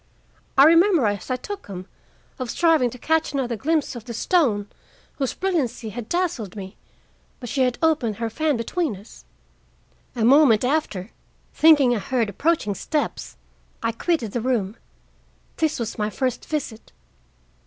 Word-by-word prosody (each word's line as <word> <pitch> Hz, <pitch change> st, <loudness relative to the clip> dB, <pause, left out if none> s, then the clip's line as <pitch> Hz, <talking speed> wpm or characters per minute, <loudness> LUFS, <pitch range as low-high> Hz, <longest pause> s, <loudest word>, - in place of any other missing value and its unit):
I 270 Hz, -, +9 dB
remember, 335 Hz, -, +5 dB
as 205 Hz, 0 st, -2 dB
I 255 Hz, -, +1 dB
took 405 Hz, +10 st, -7 dB
them, 185 Hz, -2 st, -7 dB, 0.5 s
of 255 Hz, -2 st, -4 dB
striving 320 Hz, -4 st, +3 dB
to 250 Hz, -, -10 dB
catch 320 Hz, +5 st, 0 dB
another 250 Hz, -4 st, -1 dB
glimpse 300 Hz, +4 st, -1 dB
of 230 Hz, -2 st, -8 dB
the 235 Hz, -, -6 dB
stone, 225 Hz, -, +1 dB, 0.5 s
whose 270 Hz, -2 st, -1 dB
brilliancy 300 Hz, -12 st, -1 dB
had 230 Hz, +1 st, -7 dB
dazzled 320 Hz, -, -2 dB
me, 195 Hz, -1 st, -8 dB, 0.6 s
but 245 Hz, -, -7 dB
she 270 Hz, -, -1 dB
had 250 Hz, -1 st, +1 dB
opened 270 Hz, -10 st, +2 dB
her 230 Hz, +2 st, -3 dB
fan 295 Hz, +4 st, 0 dB
between 275 Hz, -, -2 dB
us. 200 Hz, +4 st, -15 dB, 0.9 s
A 225 Hz, -2 st, +1 dB
moment 255 Hz, -3 st, +5 dB
after, 250 Hz, -9 st, -1 dB, 0.4 s
thinking 290 Hz, -6 st, +5 dB
I -, -, -1 dB
heard 235 Hz, 0 st, -1 dB
approaching 295 Hz, -, 0 dB
steps, 295 Hz, -, -3 dB, 0.5 s
I 230 Hz, -, +1 dB
quitted 235 Hz, -, -1 dB
the 240 Hz, -, -2 dB
room. 225 Hz, -5 st, -1 dB, 0.8 s
This 315 Hz, -2 st, 0 dB
was 230 Hz, -1 st, -4 dB
my 210 Hz, 0 st, 0 dB
first 255 Hz, +2 st, -2 dB
visit." 265 Hz, -8 st, -5 dB
250 Hz, 155 wpm, -23 LUFS, 220-310 Hz, 0.9 s, I